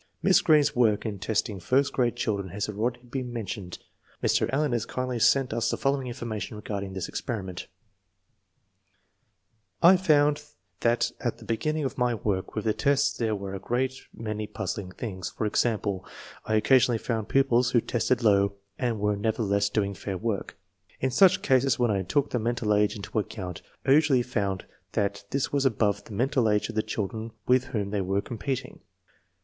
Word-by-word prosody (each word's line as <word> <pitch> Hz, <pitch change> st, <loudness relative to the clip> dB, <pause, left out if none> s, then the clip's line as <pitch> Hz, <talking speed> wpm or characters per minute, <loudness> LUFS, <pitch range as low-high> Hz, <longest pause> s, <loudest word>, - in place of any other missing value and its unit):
Miss 190 Hz, -1 st, +5 dB
Greene's 150 Hz, -2 st, +4 dB
work 115 Hz, -4 st, +3 dB
in 105 Hz, -3 st, -3 dB
testing 105 Hz, 0 st, -1 dB
first 135 Hz, +10 st, +1 dB
grade 120 Hz, -2 st, +1 dB
chil 110 Hz, -3 st, 0 dB
dren 95 Hz, -1 st, -5 dB
has 100 Hz, +3 st, -3 dB
already 115 Hz, +4 st, -2 dB
been 125 Hz, 0 st, -5 dB
mentioned. 100 Hz, -6 st, -5 dB, 0.4 s
1 -, -, +1 dB
Mr. -, -, +2 dB
Allen 145 Hz, +1 st, +1 dB
has 120 Hz, -3 st, -1 dB
kindly 130 Hz, -1 st, -2 dB
sent 135 Hz, +3 st, +3 dB
us 115 Hz, -, 0 dB
the -, -, -1 dB
following 135 Hz, -1 st, 0 dB
information 115 Hz, -3 st, -5 dB
regarding 100 Hz, -2 st, -5 dB
this 95 Hz, -2 st, -3 dB
experiment: 95 Hz, -6 st, -5 dB, 2.2 s
I 180 Hz, +3 st, +8 dB
found 150 Hz, -4 st, +3 dB, 0.4 s
that 120 Hz, 0 st, +2 dB
at -, -, -2 dB
the -, -, -13 dB
beginning 155 Hz, +7 st, -1 dB
of 135 Hz, -, -4 dB
my 125 Hz, -1 st, +2 dB
work 100 Hz, -3 st, -2 dB
with 110 Hz, -, -3 dB
the 110 Hz, -, +2 dB
tests 140 Hz, +2 st, +2 dB
there 110 Hz, -2 st, 0 dB
were 100 Hz, -1 st, -5 dB
a 100 Hz, -, -4 dB
great 125 Hz, +6 st, -1 dB, 0.2 s
many 110 Hz, -1 st, -4 dB
puzzling 100 Hz, -3 st, -4 dB
things. 95 Hz, -3 st, -5 dB
For 110 Hz, -, -3 dB
example, 105 Hz, -3 st, 0 dB, 0.4 s
I 110 Hz, -, 0 dB
occasionally 120 Hz, +2 st, +4 dB
found 110 Hz, -2 st, -3 dB
pupils 125 Hz, -3 st, +3 dB
who 120 Hz, -, +4 dB
tested 120 Hz, +1 st, 0 dB
low 100 Hz, -2 st, +4 dB, 0.3 s
and 120 Hz, -4 st, -1 dB
were 105 Hz, 0 st, +1 dB
never 110 Hz, +3 st, -1 dB
theless 100 Hz, 0 st, +1 dB
doing 100 Hz, -2 st, 0 dB
fair 95 Hz, -1 st, -5 dB
work. 105 Hz, 0 st, -3 dB, 0.4 s
In 130 Hz, -, 0 dB
such 185 Hz, +8 st, +5 dB
cases 130 Hz, 0 st, +3 dB
when 120 Hz, -2 st, +2 dB
I 100 Hz, -2 st, +1 dB
took 115 Hz, +10 st, 0 dB
the 125 Hz, -, 0 dB
mental 110 Hz, -1 st, 0 dB
age 105 Hz, +1 st, +2 dB
into 105 Hz, +1 st, -3 dB
account 95 Hz, -5 st, -5 dB, 0.2 s
I -, -, +3 dB
usually 140 Hz, -4 st, +5 dB
found 100 Hz, -6 st, -2 dB, 0.3 s
that 100 Hz, 0 st, -1 dB
this 140 Hz, +3 st, -1 dB
was 140 Hz, -1 st, +2 dB
above 105 Hz, -5 st, +1 dB
the 110 Hz, -, -10 dB
mental 125 Hz, +1 st, +2 dB
age 105 Hz, +1 st, +1 dB
of 115 Hz, -, -6 dB
the 110 Hz, -, +2 dB
children 110 Hz, +2 st, -4 dB
with 130 Hz, 0 st, +4 dB
whom 105 Hz, -7 st, -3 dB
they 105 Hz, -1 st, 0 dB
were 95 Hz, +2 st, 0 dB
com 120 Hz, -, -7 dB
peting. 135 Hz, +1 st, -3 dB
115 Hz, 185 wpm, -27 LUFS, 100-130 Hz, 2.2 s, I